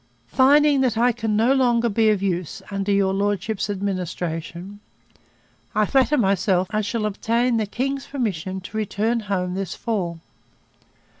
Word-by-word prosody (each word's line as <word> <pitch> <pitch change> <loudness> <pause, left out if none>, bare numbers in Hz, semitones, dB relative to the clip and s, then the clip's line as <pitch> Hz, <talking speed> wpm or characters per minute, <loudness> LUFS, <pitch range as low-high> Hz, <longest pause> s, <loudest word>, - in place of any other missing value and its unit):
'Finding 285 +1 +4
that 245 -4 +1
I 245 +2 +4
can 225 -2 -2
no 235 +5 +4
longer 240 -3 +2
be 220 0 +2
of 205 -2 +1
use, 180 -4 -2
under 195 0 -1
your 195 -1 +2
Lordship's 205 +1 -1
administration... 185 -1 -4 1.0
I 215 0 +3
flatter 270 +5 +2
myself 190 -3 +2
I 215 0 +1
shall 215 +1 -2
obtain 230 +3 0
the 215 -2 -1
king's 270 +5 -3
permission 190 - -3
to 205 +4 -7
return 220 +2 0
home 190 -4 -2
this 190 -2 -4
fall. 180 -8 -3
210 Hz, 145 wpm, -22 LUFS, 190-235 Hz, 1.0 s, Finding